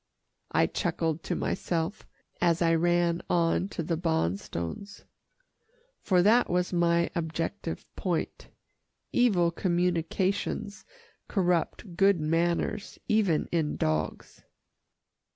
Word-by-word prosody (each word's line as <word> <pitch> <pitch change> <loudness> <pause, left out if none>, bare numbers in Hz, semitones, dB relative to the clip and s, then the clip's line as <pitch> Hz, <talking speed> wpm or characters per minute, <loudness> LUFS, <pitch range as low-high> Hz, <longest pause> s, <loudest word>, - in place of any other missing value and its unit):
I - - +3
chuckled 165 -3 -1
to - - -1
myself, 170 +2 -2 0.3
as 170 -1 +3
I 165 0 +3
ran 175 +1 +2
on 170 +1 +2
to 170 - -4
the 165 +1 -1
Bonstones, 160 - -3 1.0
for 180 -2 +3
that 225 +5 +4
was 180 +1 0
my 170 0 +2
objective 165 +2 -3
point. 175 -4 -3 0.6
Evil 190 -9 +3
communications 180 +3 -1 0.4
corrupt 180 -1 0
good 195 0 +4
manners 170 +6 -1
even 200 -8 +2
in 160 -3 0
dogs. 80 0 -2
170 Hz, 100 wpm, -28 LUFS, 165-185 Hz, 1.0 s, that